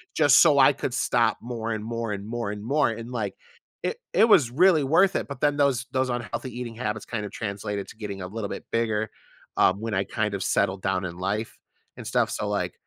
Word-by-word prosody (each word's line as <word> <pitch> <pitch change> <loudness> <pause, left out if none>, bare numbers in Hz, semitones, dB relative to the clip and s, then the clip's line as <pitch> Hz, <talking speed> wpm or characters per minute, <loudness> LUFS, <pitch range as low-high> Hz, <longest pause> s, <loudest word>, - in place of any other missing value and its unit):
just 145 -2 +6
so 150 -4 +6
I 135 +2 +7
could 135 -2 -4
stop 115 -3 +2
more 115 -1 -4
and 110 -1 -3
more 115 -1 -3
and 100 0 -5
more 115 -2 -3
and 105 0 -6
more, 140 +3 +2
and 115 +1 -6
like, 120 - -2 0.5
it - - -1 0.2
it 225 - +5
was 140 - +5
really 165 +2 +4
worth 185 +8 +4
it, - - -1
but 140 - -6
then 145 -1 +3
those 135 -4 +2
those 130 0 +1
unhealthy 120 +1 -4
eating 120 -2 -6
habits 110 -3 -3
kind 110 -3 -4
of 105 - -7
translated 100 -1 -4
to - - -12
getting 100 -3 -6
a 90 - -4
little 105 +1 -5
bit - - -6
bigger, 110 -2 0 0.5
um, 95 +2 +4
when 115 -1 -3
I 95 0 +1
kind 105 +1 -2
of 100 -1 -2
settled 95 0 +1
down 90 0 -1
in 85 -1 -6
life 100 +5 -3 0.4
and - - -8
stuff, - - +1
so - - -3
like - - -1
115 Hz, 230 wpm, -25 LUFS, 105-130 Hz, 0.5 s, I